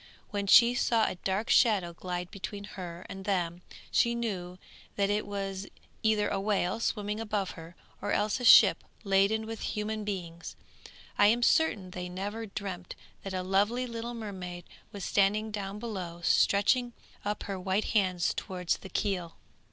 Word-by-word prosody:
When 200 -1 -2
she 235 +4 +8
saw 230 -2 +2
a - - -1
dark 190 +4 -2
shadow 200 -8 +4
glide 180 0 -5
between 200 0 -6
her 180 -3 -8
and 195 0 -8
them, 180 -3 -1 0.3
she 235 0 +3
knew 185 -6 -3 0.4
that 200 0 +1
it 210 0 -1
was 195 -1 -4 0.3
either 215 -2 +2
a 195 - -1
whale 195 -1 0
swimming 210 -2 -2
above 210 -3 -2
her, 165 +1 -11 0.3
or - - -2
else 210 +4 +1
a - - -6
ship 235 - +8 0.2
laden 200 +2 +2
with 225 0 -6
human 215 0 -3
beings. 175 -4 -5 0.6
I 205 - +7
am 235 +3 +3
certain 215 -12 +2
they 180 0 -5
never 205 +5 -4
dreamt 190 -3 -6 0.3
that 195 -1 -5
a 185 - -2
lovely 205 +7 +1
little 235 0 -5
mermaid 185 -5 -6 0.3
was 200 -2 -6
standing 210 +2 +2
down 200 -1 -4
below, 185 -7 -5
stretching 240 +8 +3 0.3
up 210 0 -2
her 195 -2 -4
white 190 +3 0
hands 185 -5 +2
towards 180 -2 -2
the 190 - -11
keel. 180 -3 -2
200 Hz, 160 wpm, -30 LUFS, 185-215 Hz, 0.6 s, she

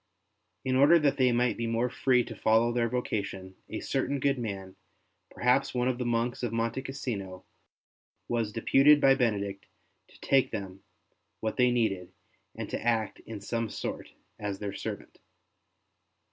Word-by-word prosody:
In 130 0 +1
order 145 +6 +7
that 150 -4 +2
they 130 -2 +4
might 120 -1 +1
be 115 - -2
more 115 +2 +1
free 125 0 +2
to - - -8
follow 115 +2 +3
their 120 -1 +1
vocation, 100 -6 -3 0.2
a - - -4
certain 140 +1 -1
good 135 -1 +1
man, 95 -5 -5 0.5
perhaps 130 +2 +1
one 125 0 +1
of 130 -1 -1
the 125 - -1
monks 120 +1 0
of 120 -3 -2
Monte 115 +2 -1
Cassino, 110 -9 -5 0.8
was 115 -3 -1
deputed 135 +7 +5
by 135 - +5
St. 135 - +3
Benedict 100 -5 -1 0.4
to - - -20
take 135 -1 +3
them 100 -3 -6 0.6
what 110 -1 -3
they 125 -1 +5
needed 110 -7 0 0.4
and - - -5
to - - -3
act 115 -3 0
in 110 -2 -6
some 115 +2 -2
sort - - -5 0.3
as 105 -2 -3
their 100 0 -5
servant. - - -7
120 Hz, 160 wpm, -29 LUFS, 105-130 Hz, 0.8 s, order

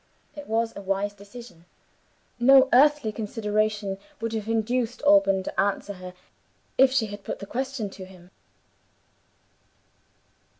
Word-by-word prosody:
It 295 -1 -9
was 225 +1 -1
a - - -7
wise 195 +1 -2
decision. 205 -3 -13 0.7
No 265 +2 +6
earthly 290 -3 +4
consideration 210 -2 -2 0.2
would 230 0 -3
have 220 -1 -4
induced 235 +3 -1
Alban 290 -11 +4
to - - -5
answer 200 +1 0
her, 185 -1 -10 0.6
if 265 0 +5
she 260 -4 +1
had 205 -1 -9
put - - -5
the - - -8
question 260 0 -3
to 190 - -10
him. 180 -1 -17
215 Hz, 130 wpm, -25 LUFS, 200-245 Hz, 0.7 s, No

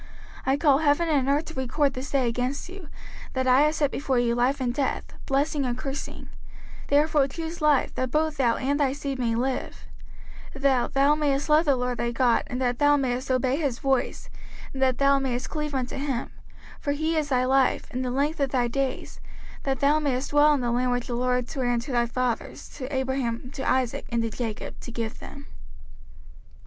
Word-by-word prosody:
05:030:019 - - +4
I 275 - +2
call 285 -3 +4
heaven 315 +2 +2
and 275 -3 +2
earth 290 +3 +2
to 320 - -9
record 270 +2 0
this 260 +2 -6
day 265 -3 +1
against 250 +7 -2
you, 365 -5 -10 0.4
that 260 0 -1
I 255 +2 +5
have 305 +1 +3
set 290 -3 +1
before 270 -2 -1
you 240 -1 +2
life 250 +4 +1
and 245 -2 -1
death, 270 0 -1 0.2
blessing 285 +2 +1
and 245 -2 -2
cursing: 270 0 -6 0.6
therefore 290 -1 +3
choose 325 +4 -6
life, 300 -3 +3
that 255 0 -2
both 310 +2 0
thou 235 -4 +3
and 280 +2 -1
thy 275 -2 +2
seed 275 -2 -4
may 230 -2 0
live: 255 +2 -3 0.7
05:030:020 275 - -9
That 265 -3 +2
thou 280 +2 +5
mayest 290 -1 0
love 305 +2 +5
the 280 -3 +4
LORD 250 -1 -2
thy 235 - 0
God, 240 0 +3
and 250 - -4
that 245 -2 0
thou 290 0 +5
mayest 255 0 -2
obey 255 +1 +1
his 280 -7 -1
voice, 270 -2 -1 0.4
and 265 - -5
that 260 -2 +3
thou 275 0 +4
mayest 255 -2 -3
cleave 300 -2 -3
unto 255 -1 -2
him: 270 -3 -3 0.5
for 285 - -1
he 315 +3 -1
is 305 -2 0
thy 255 -2 +2
life, 265 0 +2
and 255 +1 -2
the 250 - -2
length 285 +5 0
of 275 -1 +1
thy 250 -2 +1
days: 265 +2 -3 0.5
that 270 -2 -1
thou 290 +2 +4
mayest 275 -2 -1
dwell 295 +1 +5
in 275 - -2
the 240 -1 0
land 250 +1 +1
which 245 -1 -1
the 245 - -4
LORD 250 0 0
sware 255 -1 -2
unto 240 +2 -1
thy 240 -1 +2
fathers, 250 -1 -3
to 260 -1 -7
Abraham, 260 -2 -2
to 265 - -3
Isaac, 255 -2 0
and 235 -1 0
to 225 - -2
Jacob, 225 -2 -5
to 240 - -9
give 230 0 -4
them. 280 0 -10
265 Hz, 210 wpm, -26 LUFS, 250-285 Hz, 0.7 s, I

